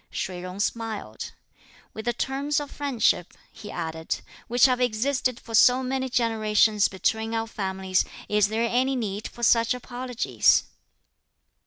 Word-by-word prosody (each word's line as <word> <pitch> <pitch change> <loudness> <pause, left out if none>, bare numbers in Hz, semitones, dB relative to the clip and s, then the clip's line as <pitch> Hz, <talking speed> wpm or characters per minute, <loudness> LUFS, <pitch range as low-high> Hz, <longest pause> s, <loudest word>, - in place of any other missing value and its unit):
Shih 180 -1 -4
Jung 185 +2 -7
smiled. 215 - -3 0.6
"With 220 - -7
the 240 - +1
terms 275 +4 -1
of 290 -1 -7
friendship," 245 -10 0 0.2
he 210 - -11
added, 160 -2 -4 0.3
"which 245 +1 +5
have 255 -1 +2
existed 250 +1 0
for 230 - -11
so 250 +3 +6
many 260 0 -2
generations 215 -3 +3
(between 220 +4 -1
our 225 0 0
families), 190 -3 -1 0.2
is 210 -1 +3
there 225 +2 0
any 255 +3 +1
need 215 -3 -3
for 240 - -11
such 230 +1 +4
apologies?" 250 -1 +1
225 Hz, 140 wpm, -25 LUFS, 210-250 Hz, 0.6 s, so